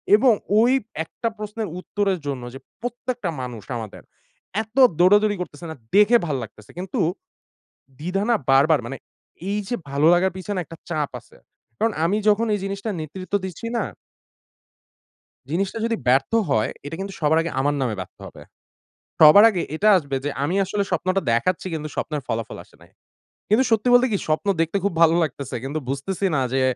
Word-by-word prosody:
এবং 235 +3 +5 0.3
ওই 235 +3 +5 0.3
একটা 200 +8 -5
প্রশ্নের 210 +1 -4
উত্তরের 195 0 -1
জন্য 135 -3 -3
যে 135 - -8 0.2
প্রত্যেকটা 245 -3 -3
মানুষ 120 -4 -6
আমাদের 110 -3 -8 0.6
এত 220 +3 -20 0.2
দৌড়াদৌড়ি 205 +3 +5
করতেছে 170 -2 -7
না? - - -7 0.2
দেখে 210 +4 +6
ভাল 150 -4 -1
লাগতেছে। 110 -1 -13
কিন্তু 185 0 -4 1.0
দ্বিধা 180 +5 -2
না - - +5 0.2
বারবার 140 +2 +5
মানে 135 +3 -5 0.5
এই 205 - 0
যে - - -1 0.2
ভালো 140 +3 +2
লাগার 185 +2 +2
পিছনে 190 +1 -4
একটা 165 +2 -11
চাপ 150 -4 -1
আছে। - - -22 0.4
কারণ 225 -1 +1
আমি 185 +5 +2
যখন 210 +2 +3
এই - - 0
জিনিসটা 200 +2 -3
নেতৃত্ব 185 +5 -7
দিচ্ছি 190 +4 -6
না? 230 - 0 1.7
জিনিসটা 190 +7 -1
যদি 230 0 0
ব্যর্থ 135 - +3 0.2
হয় 110 -5 +2 0.2
এটা 145 - -5
কিন্তু 195 0 -5
সবার 155 0 +3
আগে 165 0 -3
আমার 145 +2 +1
নামে 120 -4 -1
ব্যর্থ - - -11
হবে। - - -13 0.8
সবার 160 +7 +9
আগে 185 -5 -2
এটা 210 +6 +3
আসবে 140 -5 -4
যে 145 - -1
আমি 165 +6 -1
আসলে 200 +2 -1
স্বপ্নটা 185 +1 0
দেখাচ্ছি 170 +12 0
কিন্তু 155 -1 -4
স্বপ্নের 150 -2 -3
ফলাফল 110 -1 -3
আসে - - -24
নাই। - - -19 0.6
কিন্তু 220 +5 +4
সত্যি 225 +1 +2
বলতে 245 +1 +6
কি? 200 - +2
স্বপ্ন 155 +5 0
দেখতে 165 +4 0
খুব 200 - +1
ভালো 165 -1 +6
লাগতেছে। 140 -3 -4
কিন্তু 140 +4 -3
বুঝতেছি 155 +9 -2
না 135 - +2
যে, 135 - +2
180 Hz, 175 wpm, -23 LUFS, 145-205 Hz, 1.7 s, সবার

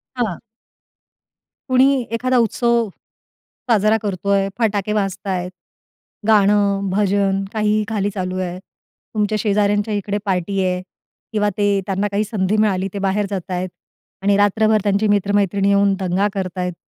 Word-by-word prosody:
हां. 220 -9 -2 1.3
कुणी 255 +1 +5 0.2
एखादा 255 +2 +1
उत्सव 235 0 +1 0.8
साजरा 215 -1 +4
करतोय, 200 0 0
फटाके 210 -2 0
वाजतायत, 195 -3 -2 0.8
गाणं, 200 -2 +3
भजन 195 0 +1
काहीही 215 -1 +1
खाली 205 -2 0
चालू 185 -2 -4
आहे. 180 -1 -4 0.6
तुमच्या 215 0 +1
शेजाऱ्यांच्या 205 +1 +1
इकडे 205 0 -2
पार्टी 195 0 -1
आहे 180 0 -1 0.5
किंवा 210 -1 +2
ते 205 - +1 0.2
त्यांना 195 +1 -1
काही 205 +1 +1
संधी 210 -1 -1
मिळाली 195 -3 +1
ते 200 - -4
बाहेर 195 +1 0
जात 190 -2 -5
आहेत 180 +1 -2 0.5
आणि 200 0 +3
रात्रभर 215 +1 +3
त्यांची 205 +1 +1
मित्र-मैत्रिणी 200 -1 +2
येऊन 200 0 +3
दंगा 190 +2 +1
करत 190 -2 -4
आहेत. 180 0 -2
200 Hz, 130 wpm, -20 LUFS, 195-210 Hz, 1.3 s, कुणी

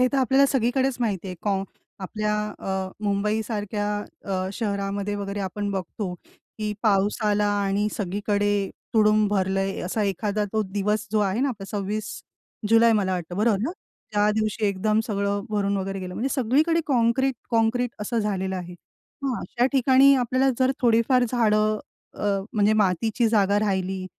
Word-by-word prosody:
हे 255 - +5
तर - - +1
आपल्याला 265 +2 +4
सगळीकडेच 260 0 +1
माहिती 205 -5 -1
आहे. 180 - -6
कॉ 195 -2 0 0.4
आपल्या 210 +2 -2 0.2
अ, 190 -1 -3 0.2
मुंबईसारख्या 210 0 -1 0.4
अ, 185 -1 -2
शहरामध्ये 200 -1 -2
वगैरे 200 0 -4
आपण 200 +2 -3
बघतो, 190 0 -4 0.5
की 210 -1 -2
पाऊस 205 -1 +2
आला 210 0 +2 0.2
आणि 200 +2 +1
सगळीकडे 205 0 0 0.2
तुडुंब 215 -1 +4
भरलंय, 195 -1 0
असा 195 +4 -2
एखादा 205 +2 -1
तो 220 - +1
दिवस 210 +2 0
जो 215 - +3
आहे 200 +2 0
ना 280 - +2
आपला 215 -7 -5
26 210 +1 -3 0.6
जुलै 230 0 +6
मला 200 -3 +1
वाटतं, 175 0 -4
बरोबर 215 -1 +2
ना? 270 - -1 0.4
त्या 205 0 +3
दिवशी 215 0 -1
एकदम 210 +3 +1
सगळं 200 -1 -1
भरून 200 -1 0
वगैरे 195 0 -3
गेलं. 180 -1 -6
म्हणजे 260 - -1
सगळीकडे 295 +7 +2
काँक्रीट-काँक्रीट 240 -2 +1
असं 230 +3 -1
झालेलं 190 -3 -1
आहे. 180 0 -7 0.5
मग 265 -3 -1
अशा 245 +2 0
ठिकाणी 270 +1 +6
आपल्याला 255 +2 +1
जर 260 0 +3
थोडीफार 245 +1 +3
झाडं 215 -3 +2 0.4
अ, - - -8 0.3
म्हणजे 210 0 +3
अ, - - +2
मातीची 215 +4 +1
जागा 205 -2 +3
राहिली 190 -2 -1
210 Hz, 155 wpm, -24 LUFS, 195-230 Hz, 0.6 s, जुलै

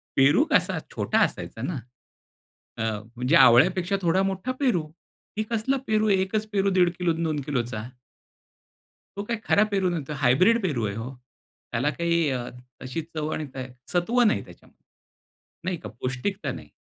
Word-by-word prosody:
पेरू 145 - +5
कसा - - +3 0.2
छोटा - - +1
असायचा - - -6
ना, 175 - -2 1.0
अ, - - -2 0.3
म्हणजे 125 +7 +2
आवळ्यापेक्षा 175 +10 +5
थोडा 185 +2 +2
मोठा 195 +6 -2
पेरू, 240 - +2 0.5
हे 215 - +1
कसला 230 +5 +1
पेरू, 215 0 +2
एकच 200 +3 +1
पेरू 200 -1 +2
1.5 180 -1 +4
किलो 175 -2 +2
न, 165 +1 -3
2 155 -2 -1
किलोचा. 120 -5 -2 1.3
तो 200 - -2
काही 230 +1 -3
खरा 205 - +4
पेरू 190 -2 +2
नव्हता. 155 -4 -3
हायब्रिड 155 - +4
पेरू 130 - 0
आहे 100 0 -3
हो. 115 +3 -5 0.6
त्याला 125 +5 +1
काही 170 0 +1 0.5
अशी 130 +6 -4
चव 155 0 -2
आणि 155 - -3
का 130 - -4 0.3
सत्व 225 +8 +2
नाही 215 - +2
त्याच्यामध्ये. - - -18 0.8
नाही 185 -1 -1
का - - -8
पौष्टिकता 130 - -3
नाही. - - -9
175 Hz, 155 wpm, -25 LUFS, 135-200 Hz, 1.3 s, पेरू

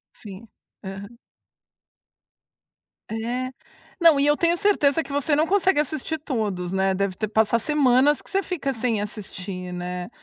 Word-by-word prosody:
Sim. 205 +1 -10 0.4
Aham. 195 +4 -8 1.9
É, 240 +3 -3 0.5
não, 330 -4 +6
e 280 - +3
eu 295 0 +3
tenho 340 0 +2
certeza 325 -6 +2
que 280 - -11
você 285 +1 +1
não 305 +2 +3
consegue 380 -2 +2
assistir 310 +2 -2
todos, 210 - -3
né? 190 0 +1
Deve 195 -1 -1
ter 215 - -2
passar 220 +2 +2
semanas 275 +1 +3
que - - -14
você 390 - +1
fica 295 -8 -3
sem 230 -3 -1
assistir, 190 -3 -6
né? 180 0 -5
245 Hz, 145 wpm, -24 LUFS, 200-295 Hz, 1.9 s, não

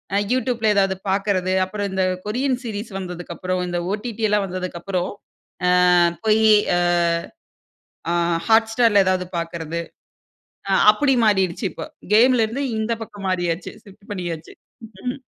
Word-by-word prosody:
அ - - +3
youtube 250 -1 0
ல - - +4
ஏதாவது 195 -1 +2
பார்க்கறது. 190 -1 0
அப்புறம் 205 +2 -4
இந்த 190 0 0 0.2
கொரியன் 255 +5 0
சீரிஸ் 215 -1 -5
வந்ததுக்கப்புறம், 180 0 -4
இந்த 175 0 -2
ஓ.டி.டி 220 +1 -4
எல்லாம் 210 -1 +1
வந்ததுக்கப்புறம். 185 0 -3 0.8
அ - - +5 0.3
போயி 220 0 +4 0.3
அ. - - +2 1.3
அ - - +1 0.3
hot 225 0 +5
star 235 +1 +4
ல 200 - +7
ஏதாவது 185 -1 0
பார்க்கறது. 170 -1 -4 0.9
அ - - +3 0.2
அப்டி 270 +5 +1
மாறிடுச்சு. 190 -2 +1
இப்ப - - -7 0.3
கேமலே 235 +1 +5
இருந்து 255 +6 -3
இந்த 220 +1 -2
பக்கம் 205 -3 -8
மாறியாச்சு. 175 -1 -2
ஷிஃப்ட் 200 +2 -18
பண்ணியாச்சு. 175 -5 -5 0.5
ம். 250 - -2
200 Hz, 135 wpm, -21 LUFS, 185-220 Hz, 1.3 s, ல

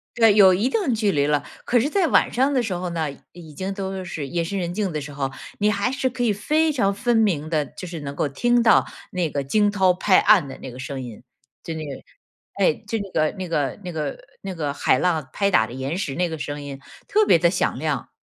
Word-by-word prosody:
对， 225 -3 +5
有 195 -3 +7
一 210 +8 +1
定 385 - 0
距 215 -3 +1
离 145 -2 +1
了。 145 -1 +1 0.2
可 245 - +3
是 265 +6 0
在 380 +2 +2
晚 - - +3
上 265 +4 +2
的 255 - +2
时 220 - -3
候 175 0 -4
呢， 165 -2 -1 0.2
已 170 -3 -12
经 190 +3 -3
都 190 -1 -4
是 155 -5 -5
夜 170 +3 -1
深 195 +4 -3
人 175 -1 -2
静 195 0 -2
的 150 - -2
时 145 +1 -8
候， 135 -1 -3 0.3
你 210 +1 +2
还 205 +4 0
是 270 -1 -1
可 255 0 -4
以 235 -3 +3
非 305 +10 +1
常 200 -9 +1
分 240 +3 +1
明 170 -9 +1
地， 155 -3 +1
就 185 - -7
是 170 -2 -6
能 140 0 -6
够 145 - 0
听 240 - +2
到 220 -4 +5 0.2
那 180 -2 -1
个 140 - -2
惊 205 +9 +2
涛 190 -3 +3
拍 185 +1 +4
岸 195 -9 +5
的 135 - -8
那 - - -7
个 125 - -11
声 130 +1 -5
音。 120 -2 -9 0.4
就 165 - -5
那 160 - -5
个， 140 -3 -6 0.6
哎， - - +5 0.2
就 225 -2 -1
那 200 - -6
个 155 0 +1
那 185 - -4
个 145 -1 -1
那 180 - -5
个 155 -3 -4 0.2
那 195 -1 -5
个 150 -5 -2
海 140 -2 +2
浪 160 -6 0
拍 200 -1 +1
打 110 - +4
的 120 - -10
岩 135 +6 -3
石 165 -8 -3
那 175 +3 0
个 160 - -5
声 145 0 -5
音 140 -1 -7 0.3
特 430 +1 +3
别 170 - +5
地 170 0 +4
响 180 -7 -1
亮。 150 -3 -2
180 Hz, 275 characters per minute, -23 LUFS, 150-210 Hz, 0.6 s, 有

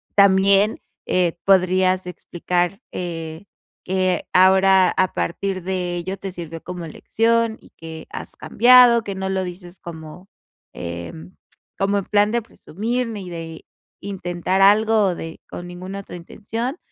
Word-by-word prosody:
también, 200 +1 +4 0.3
eh, 175 -2 +1
podrías 185 -1 +3
explicar, 180 +2 -2
eh, 165 0 -5 0.4
que 185 -1 0
ahora, 190 0 +5
a 185 0 0
partir 185 +1 -2
de 180 -1 -2
ello, 185 +3 -4
te 195 -1 -6
sirvió 165 -2 -7
como 180 -2 -6
lección, 230 +6 0
y - - -18
que 160 -1 -9
has - - -7
cambiado. 240 -1 +6
Que 200 - -4
no 190 0 -3
lo 190 0 -1
dices 180 0 -10
como, 165 +2 -10 0.5
em, 85 0 -8 0.4
como 200 +1 +1
en 195 - -6
plan 210 0 +2
de 235 +1 0
presumir, 230 +3 -4
ni 205 -5 -6
de 165 -1 -8 0.4
intentar 185 -1 -2
algo, 215 +1 +5
o 180 - -1
de 165 -1 -8
con 175 - -7
ninguna 185 +2 -7
otra 190 -2 -9
intención. 225 - -5
185 Hz, 140 wpm, -21 LUFS, 175-200 Hz, 0.5 s, cambiado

